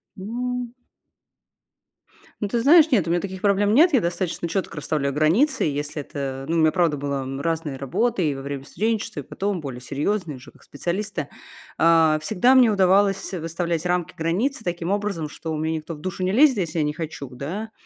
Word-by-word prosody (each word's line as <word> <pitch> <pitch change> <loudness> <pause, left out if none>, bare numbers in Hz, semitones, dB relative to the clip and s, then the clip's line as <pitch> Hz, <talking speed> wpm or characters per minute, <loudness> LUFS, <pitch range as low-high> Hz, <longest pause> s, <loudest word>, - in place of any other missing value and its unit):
Ну. 245 +5 -3 1.7
Ну, 205 - 0
ты 235 - 0
знаешь, 310 +4 +6
нет, 200 -10 +3
у - - -1
меня 175 - +2
таких 190 0 -6
проблем 205 0 +2
нет. 325 +5 +5
Я 245 - +5
достаточно 175 0 -2
четко 175 -1 -3
расставляю 145 -1 -1
границы. 190 - +2
И - - 0
если 145 +1 -4
это, 135 -1 -5
ну, 165 - 0
у - - +3
меня 155 -1 +4
правда 170 -5 +2
была, 140 -1 -3
м, 135 +1 -5
разная 160 -4 -2
работа 190 - 0
и 150 -4 +1
во 135 - -7
время 140 -1 -5
студенчества, 220 +7 -2
и - - -12
потом 200 -2 -3
более 130 -4 -7
серьезные, 155 - -2
уже 125 - -14
как - - -23
специалиста. 175 0 -4 0.5
А, 160 -1 +5
всегда 220 +8 +3
мне 255 -3 +6
удавалось 195 0 +2
выставлять 170 0 -2
рамки, 175 -1 -1
границы 205 - -1
таким 175 -1 -3
образом, 200 -7 -2
что 160 +1 -5
мне 160 +1 -1
никто 160 +1 -7
в - - -13
душу 185 +2 -4
не 185 - +1
лезет, 265 +1 +5
если 165 -2 -2
я 155 - +2
не 150 0 -1
хочу, 155 -4 -6
да. 175 - -6
170 Hz, 195 wpm, -23 LUFS, 150-205 Hz, 1.7 s, знаешь